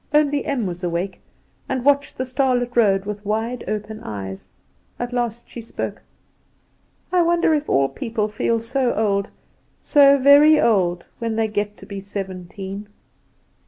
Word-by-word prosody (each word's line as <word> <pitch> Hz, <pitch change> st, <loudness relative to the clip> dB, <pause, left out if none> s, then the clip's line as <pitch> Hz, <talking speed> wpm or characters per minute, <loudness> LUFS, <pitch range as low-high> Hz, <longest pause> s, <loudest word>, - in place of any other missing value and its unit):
Only 290 Hz, -1 st, +3 dB
Em 260 Hz, -6 st, -1 dB
was 180 Hz, -1 st, -5 dB
awake, 175 Hz, +2 st, -3 dB, 0.5 s
and 260 Hz, -1 st, -2 dB
watched 285 Hz, 0 st, +2 dB
the 255 Hz, -, -2 dB
starlit 250 Hz, -2 st, 0 dB
road 200 Hz, -4 st, +3 dB
with 205 Hz, 0 st, -5 dB
wide 225 Hz, +4 st, -2 dB
open 215 Hz, 0 st, -4 dB
eyes. 95 Hz, -, -7 dB, 0.5 s
At 245 Hz, 0 st, -4 dB
last 240 Hz, -1 st, -2 dB
she 235 Hz, -, -8 dB
spoke. 230 Hz, -, -5 dB, 1.1 s
"I 365 Hz, -1 st, +4 dB
wonder 340 Hz, -1 st, +3 dB
if 300 Hz, -1 st, -1 dB
all 135 Hz, 0 st, +3 dB
people 225 Hz, -, -3 dB
feel 225 Hz, +2 st, 0 dB
so 245 Hz, +2 st, 0 dB
old, 200 Hz, -2 st, 0 dB, 0.5 s
so 280 Hz, -2 st, +6 dB
very 285 Hz, +3 st, +7 dB
old, 180 Hz, -6 st, +2 dB
when 230 Hz, -1 st, -2 dB
they 225 Hz, 0 st, +1 dB
get 210 Hz, -1 st, -3 dB
to -, -, -13 dB
be 200 Hz, -2 st, -7 dB
seventeen?" 195 Hz, +1 st, -6 dB
225 Hz, 150 wpm, -21 LUFS, 200-260 Hz, 1.1 s, very